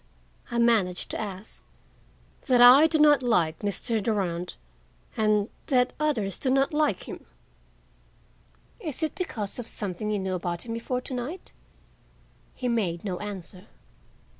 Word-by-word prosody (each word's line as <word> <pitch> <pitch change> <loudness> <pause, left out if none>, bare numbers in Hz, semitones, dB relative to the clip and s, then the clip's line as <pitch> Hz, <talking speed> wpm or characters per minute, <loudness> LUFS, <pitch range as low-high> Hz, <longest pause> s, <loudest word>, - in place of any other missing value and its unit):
I 240 - -3
managed 220 -7 +2
to - - -3
ask. 205 0 -8 0.8
"That 250 -2 +4
I 255 +6 +9
do 320 - +1
not 295 -2 +5
like 175 -10 +1
Mr. 215 +2 -1
Durand 180 -5 -2 0.6
and—that 220 +4 +1
others 230 - -1
do 265 - -1
not 270 +3 +2
like 300 0 +1
him." - - -9 1.5
"Is 320 - -4
it 315 - -1
because 245 - -4
of 240 - -5
something 205 +1 -2
you 210 - 0
knew 190 -1 -2
about 175 0 -3
him 230 - -4
before 250 +2 -3
to 260 - -7
night?" 255 +9 -5 1.0
He 250 - -3
made 195 -8 -1
no 185 -3 -3
answer. 190 -2 -8
225 Hz, 140 wpm, -26 LUFS, 195-255 Hz, 1.5 s, I